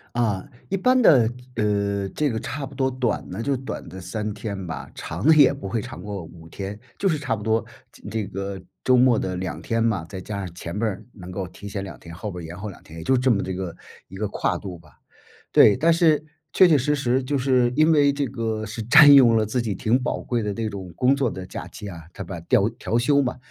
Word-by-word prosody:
啊， 105 Hz, -6 st, 0 dB, 0.2 s
一 195 Hz, -, 0 dB
般 255 Hz, +7 st, +3 dB
的， 125 Hz, -, +6 dB, 0.3 s
呃， 100 Hz, -2 st, 0 dB
这 150 Hz, -2 st, +1 dB
个 110 Hz, -, -2 dB
差 140 Hz, -1 st, -5 dB
不 135 Hz, -, -11 dB
多 130 Hz, 0 st, 0 dB
短 125 Hz, -3 st, -2 dB
的 100 Hz, +6 st, -5 dB
就 140 Hz, -1 st, +1 dB
短 130 Hz, -, -6 dB
的 95 Hz, -, -9 dB
3 105 Hz, +3 st, -4 dB
天 100 Hz, -3 st, -5 dB
吧， 80 Hz, -, -6 dB
长 85 Hz, +8 st, -5 dB
的 160 Hz, -, +7 dB
也 145 Hz, -2 st, +6 dB
不 135 Hz, -8 st, -7 dB
会 110 Hz, +3 st, -1 dB
长 120 Hz, -7 st, -9 dB
过 100 Hz, -3 st, -6 dB
5 80 Hz, 0 st, -13 dB
天， 100 Hz, +4 st, -7 dB, 0.2 s
就 195 Hz, -, +1 dB
是 155 Hz, -, +1 dB
差 130 Hz, -6 st, -1 dB
不 105 Hz, -, -8 dB
多 110 Hz, 0 st, +1 dB, 0.3 s
这 -, -, -19 dB
这 110 Hz, -2 st, -2 dB
个 100 Hz, +1 st, -5 dB, 0.2 s
周 130 Hz, -, +4 dB
末 125 Hz, -2 st, +5 dB
的 95 Hz, -1 st, -3 dB
2 85 Hz, -4 st, -4 dB
天 115 Hz, +3 st, 0 dB
嘛， 105 Hz, -8 st, 0 dB
再 95 Hz, -2 st, -7 dB
加 100 Hz, +2 st, -5 dB
上 90 Hz, -4 st, -6 dB
前 85 Hz, +1 st, -6 dB
边 115 Hz, -, +1 dB
儿 95 Hz, -, -7 dB
能 90 Hz, -5 st, -11 dB
够 95 Hz, 0 st, -4 dB
提 100 Hz, -, -10 dB
前 100 Hz, -1 st, -4 dB
2 85 Hz, -10 st, -9 dB
天， 85 Hz, 0 st, -11 dB
后 105 Hz, +3 st, -5 dB
边 90 Hz, -2 st, -7 dB
延 85 Hz, +3 st, -9 dB
后 105 Hz, +2 st, -5 dB
2 95 Hz, -, -12 dB
天， 80 Hz, -, -13 dB
也 80 Hz, -, -7 dB
就 130 Hz, +8 st, +3 dB
这 130 Hz, +1 st, +2 dB
么 105 Hz, -4 st, +2 dB
这 95 Hz, -, -4 dB
个 90 Hz, -2 st, -5 dB, 0.3 s
一 95 Hz, -, -12 dB
个 105 Hz, -, -2 dB
跨 -, -, -1 dB
度 95 Hz, -4 st, -7 dB
吧。 -, -, -21 dB, 0.5 s
对， 105 Hz, -, +7 dB
但 160 Hz, +6 st, +3 dB
是 160 Hz, -3 st, +3 dB, 0.3 s
确 185 Hz, -, +7 dB
确 160 Hz, -4 st, +5 dB
实 150 Hz, +3 st, +1 dB
实 130 Hz, -1 st, +1 dB
就 140 Hz, +2 st, -1 dB
是 125 Hz, -2 st, +2 dB
因 155 Hz, +2 st, +4 dB
为 145 Hz, -2 st, +5 dB
这 140 Hz, 0 st, -1 dB
个 110 Hz, -3 st, -3 dB
是 110 Hz, +2 st, -6 dB
占 145 Hz, +6 st, +8 dB
用 125 Hz, -5 st, +7 dB
了 110 Hz, -, +2 dB
自 120 Hz, +4 st, -1 dB
己 110 Hz, -4 st, -2 dB
挺 120 Hz, +6 st, +1 dB
宝 -, -, -2 dB
贵 120 Hz, -2 st, -1 dB
的 105 Hz, -, -2 dB
那 110 Hz, +1 st, -3 dB
种 95 Hz, -4 st, -8 dB
工 130 Hz, +2 st, +3 dB
作 135 Hz, -4 st, 0 dB
的 95 Hz, -1 st, -7 dB
假 -, -, -7 dB
期 105 Hz, -, -9 dB
啊， 85 Hz, -3 st, -9 dB
它 100 Hz, -, -6 dB
把 85 Hz, 0 st, -7 dB
调 85 Hz, -, +2 dB
调 115 Hz, -, -1 dB
休 140 Hz, +4 st, +3 dB
嘛， 125 Hz, -2 st, -2 dB
110 Hz, 260 characters per minute, -23 LUFS, 95-130 Hz, 0.5 s, 占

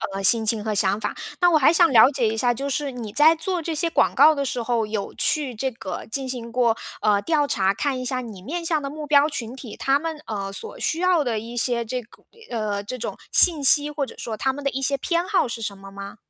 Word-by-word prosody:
呃， 195 Hz, -, -4 dB
心 225 Hz, +3 st, +4 dB
情 215 Hz, -1 st, +1 dB
和 215 Hz, 0 st, -2 dB
想 200 Hz, 0 st, +1 dB
法。 210 Hz, -, -4 dB, 0.2 s
但 355 Hz, -1 st, +4 dB
我 320 Hz, -, +5 dB
还 300 Hz, +1 st, +5 dB
想 340 Hz, 0 st, +5 dB
了 230 Hz, 0 st, +7 dB
解 265 Hz, -5 st, 0 dB
一 220 Hz, -, -1 dB
下， 245 Hz, +2 st, +2 dB
就 270 Hz, +4 st, -4 dB
是 280 Hz, 0 st, -2 dB
你 230 Hz, -5 st, -7 dB
在 300 Hz, +6 st, +6 dB
做 350 Hz, +2 st, -3 dB
这 325 Hz, 0 st, -4 dB
些 310 Hz, +3 st, 0 dB
广 -, -, +2 dB
告 315 Hz, -, +7 dB
的 280 Hz, -2 st, -2 dB
时 250 Hz, -2 st, -3 dB
候， 230 Hz, -2 st, -1 dB
有 210 Hz, -2 st, -4 dB
去 290 Hz, -5 st, 0 dB
这 265 Hz, +4 st, -2 dB
个 225 Hz, -6 st, -7 dB
进 270 Hz, +1 st, -2 dB
行 240 Hz, -2 st, -6 dB
过， 235 Hz, -2 st, +2 dB, 0.3 s
呃， 205 Hz, -2 st, +2 dB
调 300 Hz, +3 st, +1 dB
查， 195 Hz, -7 st, 0 dB
看 275 Hz, +1 st, -2 dB
一 -, -, -5 dB
下 255 Hz, 0 st, -2 dB
你 220 Hz, -6 st, -10 dB
面 335 Hz, -, -5 dB
向 320 Hz, -2 st, 0 dB
的 275 Hz, -, -5 dB
目 305 Hz, +1 st, -7 dB
标 290 Hz, 0 st, +4 dB
群 245 Hz, -6 st, -6 dB
体， 255 Hz, -5 st, -10 dB
他 275 Hz, +1 st, +1 dB
们， 325 Hz, 0 st, -5 dB
呃， 200 Hz, -2 st, -5 dB
所 450 Hz, -, -8 dB
需 325 Hz, -, -1 dB
要 360 Hz, -3 st, +2 dB
的 240 Hz, -4 st, -2 dB
一 230 Hz, +3 st, -7 dB
些 235 Hz, 0 st, 0 dB
这 250 Hz, +3 st, -3 dB
个 235 Hz, -, -21 dB, 0.3 s
呃， 215 Hz, -4 st, -3 dB
这 250 Hz, +5 st, -6 dB
种 235 Hz, -, -5 dB, 0.2 s
信 320 Hz, -5 st, +6 dB
息， 290 Hz, +2 st, +5 dB
或 295 Hz, -1 st, -3 dB
者 270 Hz, -, -7 dB
说 225 Hz, -, -5 dB
他 265 Hz, +5 st, 0 dB
们 285 Hz, +2 st, -8 dB
的 275 Hz, -, 0 dB
一 270 Hz, -, -4 dB
些 275 Hz, +1 st, +1 dB
偏 340 Hz, +5 st, -1 dB
好 380 Hz, -9 st, +1 dB
是 235 Hz, -1 st, -6 dB
什 205 Hz, -2 st, -4 dB
么 195 Hz, 0 st, -12 dB
吗？ 200 Hz, 0 st, -9 dB
255 Hz, 285 characters per minute, -23 LUFS, 220-295 Hz, 0.3 s, 了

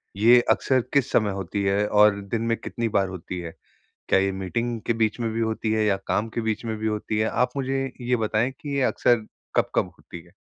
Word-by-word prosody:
ये 120 Hz, +4 st, +6 dB
अक्सर 130 Hz, -2 st, +2 dB
किस 140 Hz, -1 st, +2 dB
समय 105 Hz, -2 st, +2 dB
होती 100 Hz, +1 st, -3 dB
है 100 Hz, +2 st, +1 dB
और 105 Hz, -1 st, +4 dB
दिन 110 Hz, +3 st, -3 dB
में 115 Hz, 0 st, 0 dB
कितनी 115 Hz, -1 st, -3 dB
बार 100 Hz, -1 st, +1 dB
होती 90 Hz, 0 st, -6 dB
है? 85 Hz, -2 st, -7 dB, 0.5 s
क्या -, -, +4 dB
ये 95 Hz, 0 st, +2 dB
मीटिंग 115 Hz, +5 st, -3 dB
के 115 Hz, -, +3 dB
बीच 110 Hz, 0 st, 0 dB
में 115 Hz, -, -1 dB
भी 115 Hz, -, -2 dB
होती 110 Hz, 0 st, -1 dB
है, 110 Hz, -1 st, +2 dB
या 100 Hz, -2 st, +2 dB
काम 110 Hz, +2 st, 0 dB
के 115 Hz, -, -3 dB
बीच 110 Hz, 0 st, -2 dB
में 110 Hz, -1 st, -3 dB
भी 110 Hz, -, -4 dB
होती 105 Hz, 0 st, -2 dB
है? 110 Hz, -, +2 dB
आप 125 Hz, -, +1 dB
मुझे 135 Hz, 0 st, -1 dB, 0.2 s
ये 125 Hz, 0 st, +1 dB
बताएँ 110 Hz, +3 st, 0 dB
कि 140 Hz, -2 st, -4 dB
ये 135 Hz, -, +2 dB
अक्सर 120 Hz, -3 st, +2 dB, 0.3 s
कब-कब -, -, +2 dB
होती 85 Hz, -, -10 dB
है। 85 Hz, -, -20 dB
110 Hz, 230 wpm, -24 LUFS, 100-120 Hz, 0.5 s, ये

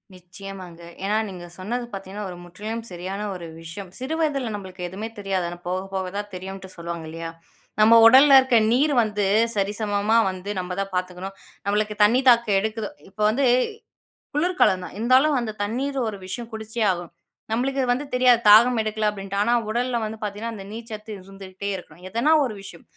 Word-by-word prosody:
நிச்சயமாங்க. 185 Hz, -1 st, -10 dB, 0.2 s
ஏன்னா 205 Hz, +2 st, +1 dB
நீங்க 180 Hz, -2 st, -8 dB
சொன்னது 240 Hz, +6 st, -3 dB
பார்த்தீங்கன்னா, 195 Hz, +1 st, -6 dB
ஒரு 175 Hz, -, -8 dB
முற்றிலும் 210 Hz, +6 st, -6 dB
சரியான 185 Hz, +3 st, -5 dB
ஒரு 175 Hz, -2 st, -7 dB, 0.2 s
விஷயம். 175 Hz, +4 st, -8 dB
சிறு 265 Hz, +5 st, -3 dB
வயதில 275 Hz, -7 st, 0 dB
நம்மளுக்கு 185 Hz, -3 st, -6 dB
எதுவுமே 205 Hz, +5 st, -6 dB
தெரியாது. 195 Hz, -3 st, -1 dB
ஆனா 175 Hz, -, -8 dB
போக, 185 Hz, +1 st, -1 dB
போக 190 Hz, -1 st, -2 dB
தான் 205 Hz, 0 st, -5 dB
தெரியுன்டு 190 Hz, +1 st, -7 dB
சொல்லுவாங்க 170 Hz, -1 st, -5 dB
இல்லயா? 165 Hz, +1 st, -6 dB, 0.5 s
நம்ம 220 Hz, +2 st, +7 dB
உடல்ல 270 Hz, +4 st, +8 dB
இருக்க 260 Hz, -2 st, +2 dB, 0.2 s
நீர் 285 Hz, +4 st, +3 dB
வந்து 210 Hz, -2 st, -1 dB, 0.3 s
சரிசமமா 205 Hz, +1 st, +1 dB
வந்து 185 Hz, +2 st, -8 dB
நம்ம 180 Hz, 0 st, -5 dB
தான் 195 Hz, 0 st, -3 dB
பார்த்துக்கணும். 185 Hz, +1 st, -4 dB, 0.3 s
நம்மளுக்கு 210 Hz, +1 st, 0 dB
தண்ணீ 230 Hz, +5 st, +5 dB
தாகம் 235 Hz, -4 st, +4 dB
எடுக்குது. 220 Hz, +1 st, -3 dB, 0.2 s
இப்ப 195 Hz, +2 st, -9 dB
வந்து 260 Hz, +6 st, +1 dB, 0.9 s
குளிர்காலம் 300 Hz, -, +2 dB
தான் -, -, -10 dB
இருந்தாலும் 260 Hz, +6 st, +4 dB
அந்த 235 Hz, -3 st, -3 dB
தண்ணீர் 265 Hz, +7 st, -2 dB
ஒரு 210 Hz, -2 st, -4 dB
விஷயம் 230 Hz, +5 st, -6 dB
குடிச்சே 220 Hz, +1 st, -5 dB
ஆகும். 175 Hz, -2 st, -5 dB, 0.4 s
நம்மளுக்கு 265 Hz, +4 st, 0 dB
வந்து 255 Hz, +4 st, 0 dB
தெரியாது 250 Hz, -2 st, +5 dB
தாகம் 230 Hz, +3 st, +7 dB
எடுக்கல 215 Hz, 0 st, -1 dB
அப்பிடின்ட்டு. 200 Hz, -1 st, -5 dB
ஆனா, 220 Hz, +3 st, +2 dB, 0.2 s
உடல்ல 240 Hz, +1 st, 0 dB
வந்து 220 Hz, 0 st, -4 dB
பார்த்தீங்கன்னா, 210 Hz, +2 st, -4 dB
அந்த 195 Hz, -, -8 dB
நீர்ச்சத்து 220 Hz, -1 st, -8 dB
இருந்துகிட்டே 195 Hz, +1 st, -8 dB
இருக்கணும். 175 Hz, -2 st, -11 dB
எதனா 235 Hz, +10 st, +2 dB
ஒரு 240 Hz, -, -4 dB
விஷயம். 175 Hz, -4 st, -11 dB
205 Hz, 165 wpm, -24 LUFS, 190-235 Hz, 0.9 s, உடல்ல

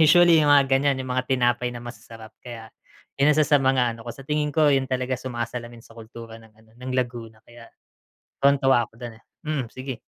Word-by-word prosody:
Usually, 165 Hz, +1 st, +6 dB
yung 150 Hz, -, +2 dB
mga 140 Hz, -1 st, +6 dB
ganyan, 135 Hz, 0 st, +2 dB
yung 130 Hz, -1 st, -4 dB
mga 130 Hz, 0 st, -2 dB
tinapay 125 Hz, -1 st, +1 dB
na 120 Hz, -, -8 dB
masasarap. 115 Hz, -2 st, -11 dB
Kaya 115 Hz, -3 st, -10 dB, 0.5 s
'yong 150 Hz, +2 st, +5 dB
isa 155 Hz, -, +4 dB
sa 145 Hz, -2 st, +3 dB
mga 130 Hz, -3 st, +2 dB
ano -, -, -14 dB
ko, 120 Hz, -, -6 dB
sa 135 Hz, +2 st, -13 dB
tingin 150 Hz, +1 st, -1 dB
ko 155 Hz, 0 st, +3 dB
yun 135 Hz, -1 st, 0 dB
talaga 130 Hz, 0 st, -2 dB
sumasalamin 120 Hz, -1 st, -6 dB
sa -, -, -17 dB
kultura 115 Hz, 0 st, -11 dB
ng 110 Hz, -1 st, -19 dB
ano 110 Hz, 0 st, -24 dB
ng 125 Hz, +1 st, -7 dB
Laguna. 115 Hz, -3 st, -4 dB
Kaya 120 Hz, 0 st, -15 dB, 0.7 s
tuwang-tuwa 135 Hz, -4 st, +3 dB
ako -, -, -47 dB
dun, 120 Hz, -2 st, -8 dB
eh. -, -, -34 dB, 0.2 s
Mm 150 Hz, -6 st, -3 dB
sige. 130 Hz, -2 st, -7 dB
125 Hz, 205 wpm, -24 LUFS, 120-140 Hz, 0.7 s, Usually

